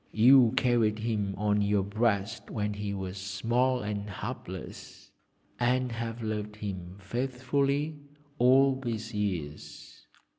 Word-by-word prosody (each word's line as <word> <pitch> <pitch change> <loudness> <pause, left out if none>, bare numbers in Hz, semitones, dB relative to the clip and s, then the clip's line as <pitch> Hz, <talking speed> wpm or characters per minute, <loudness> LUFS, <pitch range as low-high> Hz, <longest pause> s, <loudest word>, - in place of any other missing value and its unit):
You 120 +1 +7
carried 115 -4 +3
him 105 -3 -1
on 105 0 +2
your 100 -1 +2
breast 105 +1 -1
when 105 -1 -2
he 100 0 -4
was 95 -1 -5
small 120 +6 0
and 105 0 -3
helpless, 95 - -7 0.5
and 125 +1 +1
have 115 0 -4
loved 105 -1 -3
him 95 -3 -6
faithfully 135 +6 -1 0.4
all 130 +2 +5
these 115 -3 -4
years!' 75 -7 -5
110 Hz, 115 wpm, -29 LUFS, 100-125 Hz, 0.5 s, You